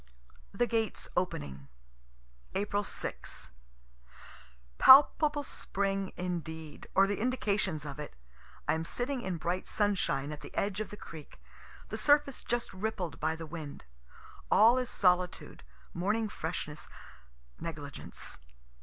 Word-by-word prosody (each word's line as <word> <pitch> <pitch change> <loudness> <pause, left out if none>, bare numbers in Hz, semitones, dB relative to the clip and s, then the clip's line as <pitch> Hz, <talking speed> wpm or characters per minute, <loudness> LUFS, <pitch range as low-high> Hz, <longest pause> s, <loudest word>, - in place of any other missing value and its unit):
THE 240 - +2
GATES 225 -3 -1
OPENING 70 - -2 0.9
April 205 +1 0
6. - - -5 1.3
Palpable 290 +2 +8
spring 195 -6 -1
indeed, 160 -4 -5
or 195 - +7
the 205 +1 -1
indications 205 -9 0
of 145 0 -6
it. 150 - -7 0.5
I - - +4
am 160 0 -1
sitting 245 +8 -1
in 185 -6 -2
bright 175 +3 -2
sunshine, 180 -9 +1
at 150 - -7
the - - -10
edge 200 0 0
of 215 - -3
the 210 - -8
creek, 155 -7 -11 0.5
the - - -4
surface 290 -2 +3
just 240 0 -2
rippled 190 -4 -3
by 160 +1 0
the 165 0 -7
wind. 155 -2 -7 0.7
All 230 +4 +7
is 250 - -2
solitude, 180 -1 +1 0.3
morning 210 +5 0
freshness, 160 -4 -4 0.7
negligence. 145 -4 -6
190 Hz, 120 wpm, -32 LUFS, 160-220 Hz, 1.3 s, Palpable